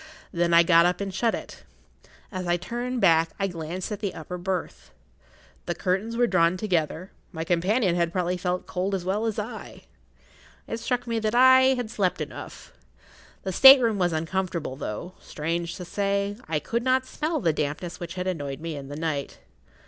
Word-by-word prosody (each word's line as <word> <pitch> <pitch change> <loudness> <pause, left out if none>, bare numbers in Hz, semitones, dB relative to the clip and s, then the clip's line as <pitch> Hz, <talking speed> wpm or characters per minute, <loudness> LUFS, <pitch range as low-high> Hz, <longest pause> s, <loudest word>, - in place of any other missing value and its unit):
Then 170 0 0
I 170 0 +7
got 170 0 +5
up 180 - -1
and 200 -1 -4
shut 225 +4 +1
it. - - -9 0.7
As 185 -2 -4
I 175 0 +2
turned 240 +6 -4
back 165 -3 +4
I 195 - 0
glanced 175 +1 -5
at 210 - -4
the 205 -3 -3
upper 180 +3 -7
berth. 185 0 -4 0.8
The[Pg - - -1
23] - - -16
curtains 200 +5 0
were 245 - +4
drawn 170 -6 +3
close 185 - -6
together; 180 -2 -1 0.2
my 160 -4 -4
companion 180 +3 +1
had 170 -1 +1
probably 180 0 -1
felt 180 0 -2
cold 190 +2 -2
as 180 -2 -4
well 205 +4 0
as 220 0 -2
I. 215 +3 -7 0.8
It 230 - -5
struck 245 +1 -2
me 230 -1 -1
that 215 +1 -1
I 260 +1 +6
had 245 -3 -4
slept 190 -6 0
enough. - - -8 0.7
The 190 - -3
state 270 +6 +10
room 225 -5 +1
was 175 -1 +2
uncomfortable, 165 -2 -2
though, 140 - -6
strange 170 +3 -3
to 180 - -7
say, 200 +2 -1
I 160 - 0
could 235 +10 -2
not 260 +1 +2
smell 310 +4 -2
the 165 -5 +1
dampness 150 +3 -3
which 175 +1 -6
had 180 0 -3
annoyed 145 -7 -3
me 165 -1 -5
in 140 -1 -7
the 145 - -7
night. 155 -4 -3
185 Hz, 195 wpm, -25 LUFS, 170-215 Hz, 0.8 s, state